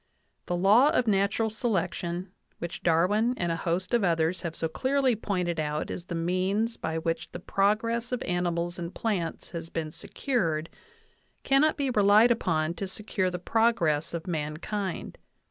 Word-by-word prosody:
The 175 - 0
law 200 +8 +6
o - - +2
f. 250 - +2
natural 205 +1 +1
selection, 185 -5 -2 0.3
which 170 0 -6
Darwin 205 +9 +2
and 175 -1 0
a - - 0
host 175 +5 -2
of 235 -3 +3
others 165 0 +1
have 170 -2 -4
so 165 - -1
clearly 260 - +1
pointed 180 -6 -2
out 150 0 -2
as 175 - -6
the 175 - -5
means 185 +7 0
by 160 0 -3
which 165 0 -2
the - - -5
progress 230 +4 0
of 250 - -2
ani 175 0 0
mals 170 +1 -3
and 170 +1 -5
plants 190 -8 -2
has 165 -1 -6
been 160 -2 -3
secured; 165 - -2 0.7
cannot 275 +3 +3
be 275 -3 0
relied 210 +2 +5
upon 160 -8 +1
to 195 +2 -4
secure 190 -1 -2
the 180 - -4
progress 175 -7 +1
of 165 - -5
mankind. 170 +4 -4
185 Hz, 165 wpm, -28 LUFS, 165-220 Hz, 0.7 s, law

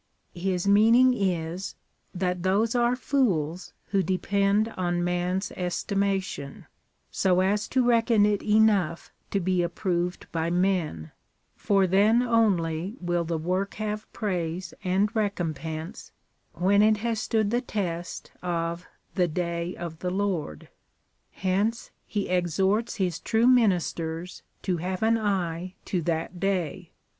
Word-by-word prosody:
His 180 +1 -2
meaning 230 +5 +6
is, 180 -4 -2 0.4
that 180 -1 -2
those 200 +5 +2
are 240 0 +2
fools 185 - 0 0.2
who 195 -1 +2
depend 200 +4 +1
on 175 -4 -1
man's 180 +2 -1
estimation, 190 -4 -2 0.5
so 185 -1 +2
as 205 +3 +1
to 255 -2 +1
reckon 230 -3 +4
it 205 -1 +1
enough 210 -6 +2 0.2
to 200 - 0
be 185 0 +1
approved 175 0 -2
by 165 0 -1
men, 175 - 0 0.4
for 195 -2 +2
then 210 +6 +4
only 195 -5 +1
will 175 -1 0
the 165 0 -2
work 185 +5 -2
have 215 0 -4
praise 175 -4 -3
and 195 +5 +1
recompense 165 - -3 0.2
— - - -46
when 200 +3 +3
it 215 0 +4
has 225 -2 0
stood 220 -4 0
the 240 +1 +1
test 175 -7 -4
of 170 0 -2 0.3
the 180 -2 +2
day 170 +1 -3
of 165 -2 -7
the 180 - -2
Lord. 185 - -2 0.6
Hence 200 +5 -1 0.2
he 205 -2 -2
exhorts 190 +5 +1
His 185 -6 -1
true 225 +1 +1
ministers 180 -8 +1 0.2
to 180 -2 0
have 185 +4 -3
an 225 +1 +3
eye 185 -3 -2
to 180 - -1
that 165 +2 -2
day. 185 -2 -1
185 Hz, 130 wpm, -26 LUFS, 175-210 Hz, 0.6 s, meaning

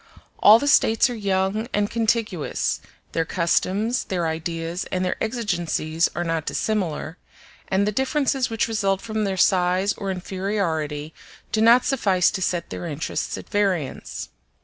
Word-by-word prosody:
All 215 +2 +8
the 285 - -2
States 225 -3 +4
are - - -4
young 200 +1 0
and 205 0 0
contiguous; 220 -7 0 0.3
their 165 - 0
customs, 190 +8 0
their 180 -3 -1
ideas, 165 +2 -3
and 185 0 0
their 180 - 0
exigencies 175 -8 0
are 175 - -1
not 165 -2 -2
dissimilar; 180 -6 -2 0.5
and 195 +1 +1
the 210 - +1
differences 265 +2 0
which 225 -1 0
result 200 -4 0
from 220 -1 -2
their 190 -1 -2
size 185 +2 +3
or 195 - -5
inferiority 175 -6 -2 0.4
do 220 - +1
not 235 +3 +6
suffice 195 -9 +2
to 190 - -4
set 175 -1 -1
their 175 - -5
interests 155 0 -3
at - - -9
variance. 190 -9 -1
190 Hz, 150 wpm, -23 LUFS, 170-220 Hz, 0.5 s, All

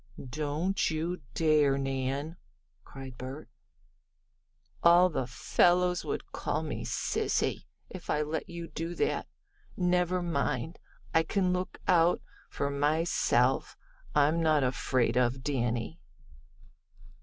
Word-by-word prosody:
"Don't 155 +7 -1
you 165 +2 -2
dare, 150 -4 +3
Nan!" 135 +3 -2 0.5
cried 135 -2 -10
Bert. 130 +3 -7 1.3
"All 175 +2 +6
the 130 -5 -2
fellows 180 +7 +2
would - - -4
call - - -2
me - - -4
'sissy,' - - -1 0.2
if 185 - -10
I 150 - +1
let 155 +1 -4
you 170 -1 -6
do 165 +2 -5
that. - - 0 0.5
Never 180 0 +1
mind, 140 -2 -2 0.3
I 160 - +5
can 185 +1 0
look 180 0 -3
out 175 -1 +4 0.3
for 140 0 -2
my 145 +3 +1
self. 130 -6 +1 0.4
I'm 150 +3 +3
not 155 -3 +3
afraid 125 -1 +1
of 125 +1 +1
Danny." 120 +2 -2
155 Hz, 115 wpm, -30 LUFS, 135-175 Hz, 1.3 s, All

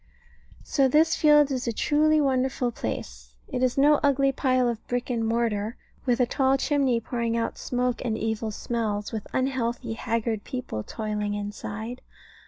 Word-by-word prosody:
So 275 -2 +2
this 310 +5 +4
field 295 -2 +5
is 255 -2 -2
a - - +2
truly 305 +6 +3
wonderful 260 -3 +1
place. - - -6
It 250 - -3
is 255 0 +1
no 290 +2 +5
ugly 275 -1 +3
pile 255 -2 +2
of 235 -2 -3
brick 245 +1 -2
and 230 -2 0
mortar, 225 -1 0 0.3
with 245 0 +2
a 250 - +5
tall 265 +2 +2
chimney 270 -4 +1
pouring 230 0 -2
out 230 - -2
smoke 250 0 -1
and 225 -3 -1
evil 220 0 -2
smells, 210 -1 -2
with 220 -2 -5
unhealthy, 245 -3 -1
haggard 225 -1 -2
people 250 - -4
toiling 210 - -3
inside. 210 +3 -5
240 Hz, 160 wpm, -26 LUFS, 220-265 Hz, 0.3 s, field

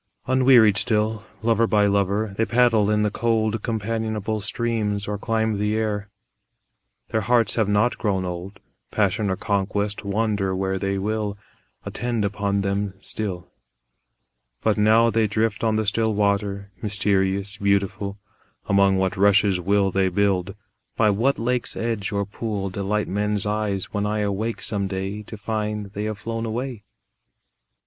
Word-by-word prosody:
Unwearied 125 -5 +5
still, 110 0 +1 0.2
lover 115 0 +3
by 105 -2 +3
lover, 100 +1 +1
They 115 - +1
paddle 115 -4 +3
in 105 0 +2
the 105 - +1
cold 110 -1 0
Companionable 110 -1 -2
streams 105 -2 -1
or 105 -1 -3
climb 110 -1 0
the 105 +1 0
air; 105 -2 -2 1.0
Their 110 - 0
hearts 115 0 +2
have 110 -3 +1
not 105 +4 +2
grown 95 -4 0
old; 90 +2 -6 0.3
Passion 105 0 +1
or 95 - +1
conquest, 100 +1 -1
wander 100 -2 0
where 95 0 -1
they 100 0 -1
will, 105 +1 -2 0.5
Attend 120 -3 -2
upon 100 0 -1
them 100 0 -1
still. 95 -4 -5 1.1
But 110 -2 +3
now 110 +2 +4
they 110 0 +2
drift 110 +2 -1
on 110 -1 +2
the 110 0 0
still 110 +1 +1
water, 100 -1 0
Mysterious, 100 -1 0
beautiful; 100 0 0 0.5
Among 100 -1 +4
what 95 +1 0
rushes 100 -1 +4
will 100 +2 +2
they 95 0 +2
build, 100 0 0 0.4
By 110 -2 +4
what 120 +8 +1
lake's 125 +1 -1
edge 115 -3 -2
or 100 -1 0
pool 100 -1 -4
Delight 100 +2 -1
men's 105 0 -1
eyes 105 -2 -2
when 105 0 0
I 105 0 -1
awake 105 +3 -2
some 100 -2 -1
day 95 +2 -4
To 110 +1 -9
find 105 -1 -3
they 105 +1 -4
have 110 -1 -3
flown 115 +3 -4
away? 120 0 -4
105 Hz, 150 wpm, -23 LUFS, 100-110 Hz, 1.1 s, Unwearied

